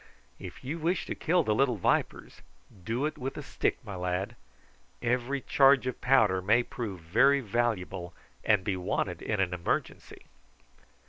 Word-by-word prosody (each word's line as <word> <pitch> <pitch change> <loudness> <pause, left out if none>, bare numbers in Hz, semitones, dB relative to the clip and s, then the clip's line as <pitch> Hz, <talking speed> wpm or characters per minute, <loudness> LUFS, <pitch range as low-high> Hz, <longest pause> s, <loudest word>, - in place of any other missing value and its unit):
"If - - -10
you 150 +6 -4
wish 170 +2 0
to - - -3
kill 175 +1 +1
the 110 - +1
little 125 +2 +2
vipers 90 - -1 0.4
do 120 +7 -1
it 155 - -4
with 135 +1 -4
a - - -5
stick, - - -1
my 100 - -6
lad. 90 +1 -2 0.6
Every 125 +3 -1
charge 135 0 +4
of 130 - -4
powder 110 -8 +3
may 110 +6 +3
prove 105 -8 -6
very 135 +13 +4
valuable, 100 -7 -2 0.3
and 105 -3 +3
be 95 0 -1
wanted 90 -1 -2
in 105 - -2
an 90 -2 +1
emergency." 85 -1 -3
115 Hz, 155 wpm, -29 LUFS, 95-135 Hz, 0.6 s, charge